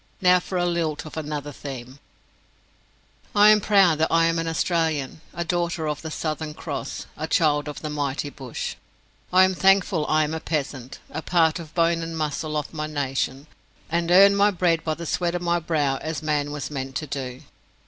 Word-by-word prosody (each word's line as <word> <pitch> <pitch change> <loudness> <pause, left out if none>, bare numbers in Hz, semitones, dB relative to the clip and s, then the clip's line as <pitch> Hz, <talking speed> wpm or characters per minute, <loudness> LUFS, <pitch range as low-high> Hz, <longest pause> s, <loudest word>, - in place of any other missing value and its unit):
Now 180 -1 +5
for 185 +1 -4
a 175 - +1
lilt 165 -4 -1
of 155 - -9
another 150 -2 -4
theme: 130 -1 -8 1.4
I 205 +1 +7
am 210 -1 +5
proud 195 -7 +4
that 160 - +1
I 165 0 +4
am 165 0 +1
an 165 - -2
Australian, 160 -4 -1
a 170 - -4
daughter 170 -2 -1
of 150 -1 -3
the 160 - -5
Southern 155 -1 -3
Cross, - - -5
a - - -4
child 150 -2 +2
of 150 - -7
the 155 - -3
mighty 145 -1 -2
bush. 130 -4 -5 0.6
I 185 +1 +7
am 185 0 +3
thankful 190 -4 +3
I 155 0 +3
am 150 +1 -2
a 160 - -2
peasant, 140 -5 -4
a - - -4
part 165 -2 +2
of 165 - -8
the 150 - -24
bone 170 -1 +2
and 165 0 -5
muscle 155 0 -2
of 150 +1 -4
my 155 -1 -3
nation, 135 -2 -2 0.5
and 170 0 0
earn 195 +3 +7
my 200 +1 +5
bread 175 -4 +1
by 155 -1 -1
the 170 - -7
sweat 175 +1 -1
of 175 - -2
my 175 0 +1
brow, 150 -5 0
as 155 +1 -5
man 150 -2 0
was 150 0 -5
meant 135 -2 -5
to 155 - -2
do. 130 -2 -5
160 Hz, 200 wpm, -24 LUFS, 145-170 Hz, 1.4 s, I